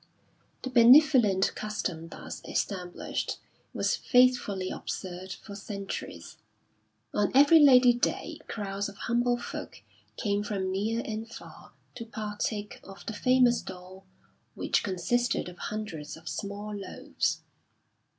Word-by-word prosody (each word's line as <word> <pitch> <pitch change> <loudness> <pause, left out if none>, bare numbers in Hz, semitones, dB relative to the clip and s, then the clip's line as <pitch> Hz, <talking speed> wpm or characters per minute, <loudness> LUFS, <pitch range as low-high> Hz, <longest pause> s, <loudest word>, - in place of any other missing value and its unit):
The 260 - -4
benevolent 240 -5 +6
custom 190 -6 -4
thus - - -8
established 180 -3 -3 0.3
was - - 0
faithfully 245 -7 +2
observed 185 +1 -6
for 205 - -8
centuries. 200 - -7 0.8
On 205 -1 +1
every 290 +4 +8
Lady 255 -4 +7
Day 240 - -2
crowds 200 -1 -3
of 200 - -13
humble 240 +2 +1
folk 240 - -8 0.3
came 205 -2 0
from 195 -3 -2
near 220 +5 -1
and 220 +1 -5
far - - -12 0.2
to 230 - -7
partake 210 -1 -4
of 195 0 -12
the 225 - -4
famous 250 +1 +3
dole 185 +1 -11 0.5
which - - +1
consisted 230 +6 0
of 180 0 -10
hundreds 165 -10 -5
of 165 +1 -15
small 205 +1 -5
loaves. 195 -2 -3
210 Hz, 120 wpm, -28 LUFS, 190-240 Hz, 0.8 s, every